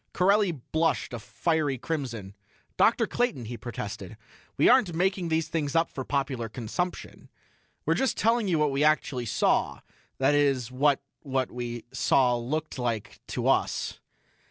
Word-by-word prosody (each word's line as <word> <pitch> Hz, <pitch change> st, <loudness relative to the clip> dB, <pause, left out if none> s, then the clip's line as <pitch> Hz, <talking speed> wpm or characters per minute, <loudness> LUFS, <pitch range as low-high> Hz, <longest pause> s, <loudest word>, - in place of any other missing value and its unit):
Corelli 200 Hz, +1 st, +3 dB
blushed 160 Hz, 0 st, -1 dB
a 120 Hz, -, -4 dB
fiery 155 Hz, +3 st, 0 dB
crimson. 120 Hz, -9 st, -4 dB, 0.4 s
"Dr. -, -, +4 dB
Clayton," 240 Hz, -, -1 dB
he 120 Hz, +2 st, -5 dB
protested, 105 Hz, -3 st, -6 dB, 0.4 s
"we -, -, +5 dB
aren't 240 Hz, -10 st, +5 dB
making 185 Hz, 0 st, 0 dB
these 160 Hz, 0 st, +1 dB
things 155 Hz, -3 st, -2 dB
up 165 Hz, 0 st, +2 dB
for 130 Hz, -, -5 dB
popular 130 Hz, -4 st, -2 dB
consumption. 130 Hz, +11 st, -4 dB, 0.6 s
We're -, -, +3 dB
just 265 Hz, -3 st, 0 dB
telling 230 Hz, -1 st, +2 dB
you 175 Hz, -4 st, +2 dB
what 150 Hz, -2 st, +2 dB
we 135 Hz, +2 st, +1 dB
actually 145 Hz, -5 st, +1 dB
saw -, -, +1 dB, 0.4 s
that 135 Hz, +2 st, +3 dB
is 135 Hz, -4 st, +2 dB
what 140 Hz, +2 st, +2 dB, 0.2 s
what 130 Hz, -3 st, -1 dB
we 120 Hz, -1 st, -5 dB
saw 125 Hz, -2 st, +3 dB
looked 145 Hz, +5 st, -3 dB
like 115 Hz, -4 st, -3 dB
to -, -, -2 dB
us." -, -, +1 dB
140 Hz, 150 wpm, -27 LUFS, 120-165 Hz, 0.6 s, we